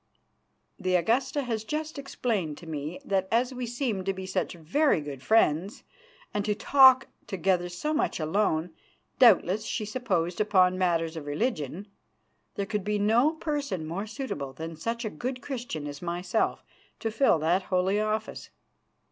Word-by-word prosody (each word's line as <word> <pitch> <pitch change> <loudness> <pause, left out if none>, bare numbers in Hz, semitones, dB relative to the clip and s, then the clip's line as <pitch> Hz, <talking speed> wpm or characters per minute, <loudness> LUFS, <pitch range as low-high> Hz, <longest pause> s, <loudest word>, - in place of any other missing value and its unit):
The 185 -2 +1
Augusta 255 - +1
has 225 -4 -2
just 305 +4 -4
explained 215 - -2
to 170 - -12
me 155 +1 -5
that 190 -1 0
as 245 +3 +2
we 250 -1 -4
seem 235 -5 -2
to 195 - 0
be 190 0 -6
such 185 0 -2
very 180 - +2
good 145 -3 -7
friends, 190 - +2 0.5
and 205 - 0
to 210 0 0
talk 265 +2 +6 0.2
together 180 -1 0
so 300 - -2
much 305 - 0
alone, 160 0 0 0.5
doubtless, 215 -4 +5
she 215 - -3
supposed, 195 -7 -1
upon 185 -3 +4
matters 170 -3 0
of 150 -3 -7
religion, 170 - -2 0.7
there 200 - -2
could 210 -1 -2
be 210 +1 0
no 230 +9 +3
person 290 - -3
more 185 +7 -4
suitable 210 - -5
than 160 +4 -6
such 230 +8 -3
a - - -1
good 255 +1 -4
Christian 245 - -5
as 145 0 -7
myself 175 +1 -1 0.4
to 225 - -2
fill 230 -4 +4
that 165 +5 +2
holy 185 +2 +2
office." 215 +1 -2
200 Hz, 155 wpm, -28 LUFS, 170-240 Hz, 0.7 s, talk